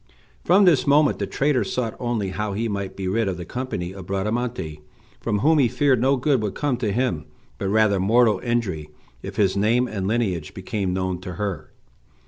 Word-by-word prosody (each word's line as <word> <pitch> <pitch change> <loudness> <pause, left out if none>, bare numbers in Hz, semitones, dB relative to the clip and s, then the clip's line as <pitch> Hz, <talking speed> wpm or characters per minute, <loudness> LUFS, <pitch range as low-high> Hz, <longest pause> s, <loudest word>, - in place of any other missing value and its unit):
From 195 +4 +5
this 160 -7 +4
moment 145 +2 +4
the - - -2
traitor 140 -4 +1
sought 115 +3 -2
only 120 -5 -1
how 105 +2 -3
he 115 +4 -1
might 100 -2 -4
be 95 -1 -4
rid 110 +3 +1
of 95 -3 -2
the 90 - -6
company 110 -8 -4
of 95 -2 -10
Bradamante, 100 -5 -2 0.4
from 105 - -1
whom 155 +3 +4
he 130 - +5
feared 130 0 +2
no 135 +2 +3
good 130 -1 +1
would 105 -3 -3
come 145 -4 0
to 115 -4 -1
him, 110 -9 -1 0.3
but 100 - -2
rather 105 -1 +3
mortal 110 +1 +3
injury, 95 -9 -2 0.3
if 95 - -7
his 100 -3 +2
name 115 +5 +2
and 100 -5 -3
lineage 100 -8 -1
became 95 0 -2
known 95 -1 -2
to 90 -1 -6
her. 100 0 -4
105 Hz, 195 wpm, -23 LUFS, 95-125 Hz, 0.4 s, From